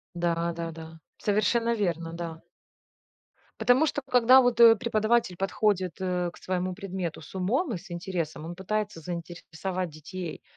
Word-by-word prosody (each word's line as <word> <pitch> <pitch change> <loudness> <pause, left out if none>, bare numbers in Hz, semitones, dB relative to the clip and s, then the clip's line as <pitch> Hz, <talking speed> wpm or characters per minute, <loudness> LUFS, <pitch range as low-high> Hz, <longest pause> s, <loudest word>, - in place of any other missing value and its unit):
Да-да-да. 165 -1 -3 0.2
Совершенно 230 +3 +1
верно, 170 -5 -2
да. 165 -1 -6 1.2
Потому 245 +7 +4
что, 290 - -1
когда 250 +1 +7
вот, 245 -2 +3
э, 230 -1 +10
преподаватель 220 -3 +1
подходит, 190 -2 0
э, 180 -2 -1
к - - -16
своему 185 0 -2
предмету 190 -3 -4
с 155 - -13
умом 235 - 0
и - - -2
с 185 +1 -13
интересом, 170 -3 -4
он 170 +1 -6
пытается 205 -1 -3
заинтересовать 175 +2 -5
детей. 165 +3 -7
185 Hz, 135 wpm, -27 LUFS, 170-215 Hz, 1.2 s, э